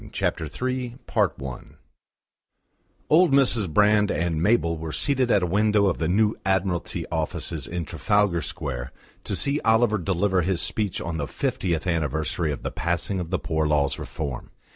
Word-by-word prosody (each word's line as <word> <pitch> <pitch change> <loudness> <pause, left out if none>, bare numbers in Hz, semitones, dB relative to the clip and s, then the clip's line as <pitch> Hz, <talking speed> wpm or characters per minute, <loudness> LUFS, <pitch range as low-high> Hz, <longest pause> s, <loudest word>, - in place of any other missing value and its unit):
CHAPTER 80 - -1
III 125 - -3 0.2
I - - +5 1.8
Old 170 +1 +5
Mrs. 125 - +3
Brand 105 +3 +4
and 80 0 -1
Mabel 90 -4 +2
were 80 0 -5
seated 130 - +1
at 100 -5 +3
a - - +3
window 105 +3 +2
of 95 -4 0
the 80 - 0
new 105 +4 +3
Admiralty 95 -2 -1
Offices - - -3
in 85 -1 -4
Trafalgar 100 0 +1
Square 65 -7 -5 0.3
to - - -1
see 140 +2 +1
Oliver 110 -1 +3
deliver 95 +1 +1
his 90 0 0
speech 105 +1 -1
on 85 0 -3
the 70 -2 -2
fiftieth 85 +1 -2
anniversary 80 -1 -1
of 70 - -6
the - - -3
passing 85 +3 -1
of 85 -2 -4
the 95 - 0
Poor 80 -2 -1
Laws 75 -2 +1
Reform. 70 -6 -5
90 Hz, 160 wpm, -25 LUFS, 80-105 Hz, 1.8 s, I